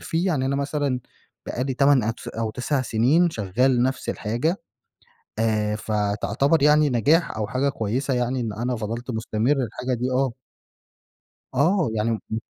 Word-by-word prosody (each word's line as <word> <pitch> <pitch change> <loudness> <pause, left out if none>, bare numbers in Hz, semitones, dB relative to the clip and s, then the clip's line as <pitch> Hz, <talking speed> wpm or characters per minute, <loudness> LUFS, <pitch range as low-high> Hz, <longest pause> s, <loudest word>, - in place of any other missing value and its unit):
فيه، 165 +3 -1
يعني 150 -8 +1
أنا 140 - 0
مثلًا 140 -2 -1 0.5
بقي 125 - -2
لي 135 - -2
8 140 -1 +4
أتس 115 +1 -4
أو 115 -1 -3
9 130 +4 -1
سنين 135 +10 +3
شغّال 120 +2 +1
نفس 130 +1 -1
الحاجة، 120 - -1 0.8
آآ 105 -1 +1
فتعتبر 105 +8 0
يعني 150 0 +5
نجاح 140 +4 +2
أو 105 -1 -1
حاجة 130 +5 0
كويسة 130 +2 -1
يعني 125 +1 0
إن 110 -3 -3
أنا 120 +4 -2
فضلت 115 +3 -4
مستمر 110 +2 -1
الحاجة 125 +1 -2
دي 125 +2 -2
آه. 130 -1 +1 1.2
آه. 160 - +2
يعني 110 +1 0 0.2
م 110 - -1
125 Hz, 155 wpm, -24 LUFS, 110-140 Hz, 1.2 s, يعني